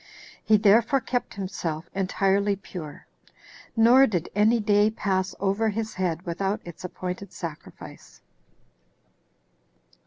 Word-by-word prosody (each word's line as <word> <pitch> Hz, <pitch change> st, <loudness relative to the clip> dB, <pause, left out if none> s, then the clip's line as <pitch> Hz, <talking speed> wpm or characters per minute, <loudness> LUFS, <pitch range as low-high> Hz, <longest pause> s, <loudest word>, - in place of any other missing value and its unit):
He 215 Hz, -1 st, +4 dB
therefore 225 Hz, +6 st, +4 dB
kept 245 Hz, 0 st, -3 dB
himself 170 Hz, -5 st, -4 dB
entirely 195 Hz, +1 st, +1 dB
pure; 180 Hz, -6 st, -9 dB, 0.7 s
nor 245 Hz, +4 st, +6 dB
did 175 Hz, -6 st, -2 dB
any 215 Hz, +3 st, +3 dB
day 205 Hz, 0 st, +3 dB
pass 190 Hz, -3 st, -2 dB
over 200 Hz, +3 st, +1 dB
his 215 Hz, +1 st, -3 dB
head 180 Hz, -2 st, -2 dB
without 195 Hz, +4 st, -2 dB
its 175 Hz, 0 st, -10 dB
appointed 180 Hz, +1 st, -6 dB
sacrifice. 165 Hz, -3 st, -10 dB
200 Hz, 105 wpm, -25 LUFS, 180-215 Hz, 0.7 s, nor